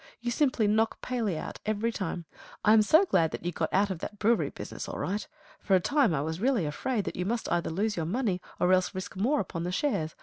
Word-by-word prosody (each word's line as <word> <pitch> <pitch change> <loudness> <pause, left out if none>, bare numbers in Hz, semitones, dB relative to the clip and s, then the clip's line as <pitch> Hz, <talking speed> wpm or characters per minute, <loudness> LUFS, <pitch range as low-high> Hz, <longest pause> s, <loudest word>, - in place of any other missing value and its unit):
You 240 +1 -2
simply 255 -4 +2
knock 220 +2 +2
Paley 225 -9 -1
out - - -6
every 215 +2 0
time. 180 -5 -4 0.4
I 215 - +7
am 220 - +7
so 315 - +5
glad 165 - +2
that - - -7
you 175 - 0
got 160 -1 -2
out 200 +1 +2
of 180 - -4
that 210 - -6
brewery 225 +3 +2
business - - -7
all - - -5
right. 205 +3 -2 0.3
For 195 - +2
a - - +5
time 280 - +2
I 145 -4 0
was 160 +3 -4
really 245 - +2
afraid 210 - -1
that - - -4
you 180 - -2
must 230 +5 -2
either 175 -1 +1
lose 205 +6 -1
your 160 -2 -2
money 200 -3 -1 0.2
or 180 +1 +4
else 185 +1 +2
risk 185 +1 -5
more 250 +10 +1
upon 165 -2 -3
the 175 - -2
shares. 175 - -1
205 Hz, 245 wpm, -29 LUFS, 175-230 Hz, 0.4 s, I